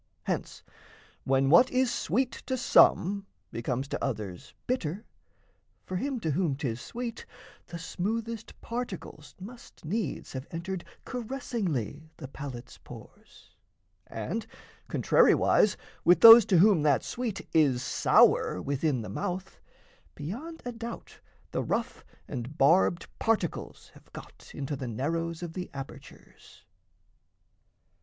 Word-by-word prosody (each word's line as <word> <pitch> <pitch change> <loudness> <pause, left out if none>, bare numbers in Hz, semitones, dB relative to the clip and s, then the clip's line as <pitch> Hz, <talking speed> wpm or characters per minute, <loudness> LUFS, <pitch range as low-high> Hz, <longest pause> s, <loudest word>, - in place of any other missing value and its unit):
Hence - - -4 0.6
when 135 +1 +2
what 210 +10 +7
is 255 -1 +1
sweet 240 - 0 0.2
to 260 - -1
some, 200 -4 +4 0.2
Becomes 125 +3 -3
to - - -3
others 105 -9 -5
bitter, 210 -5 -2 0.8
for 185 - -3
him 270 +4 -2
to 160 - -1
whom 155 -2 0
'Tis 130 -4 -4
sweet, 235 -1 -6 0.4
the 170 - -7
smoothest 225 +7 -4
particles 205 -10 -6
must 230 -2 -12
needs 210 +7 -3
Have 130 +1 -6
entered 175 +2 -5 0.2
caressingly 205 - -4
the 135 - -8
palate's 130 -3 -9
pores. - - -15 0.5
And, - - -4 0.4
contrariwise, - - +4 0.3
with 175 +1 +5
those 230 -1 +11
to 185 - +3
whom 190 -2 +5
that 145 -2 +3
sweet 235 -5 -4
Is 140 -6 +3
sour - - +3
within 140 - -1
the 105 - -7
mouth, 185 - -4 0.6
beyond 250 - -7
a 245 - -3
doubt 230 0 -8 0.3
The - - -1
rough - - -3 0.2
and 130 +2 -6
barbed 170 +4 +4
particles 220 -7 -2
have - - -20
got - - -12
Into 140 +1 -3
the 130 -2 -5
narrows 165 +8 -3
of 170 -2 -6
the 180 0 -5
apertures. 135 -1 -12
170 Hz, 120 wpm, -28 LUFS, 140-225 Hz, 0.8 s, those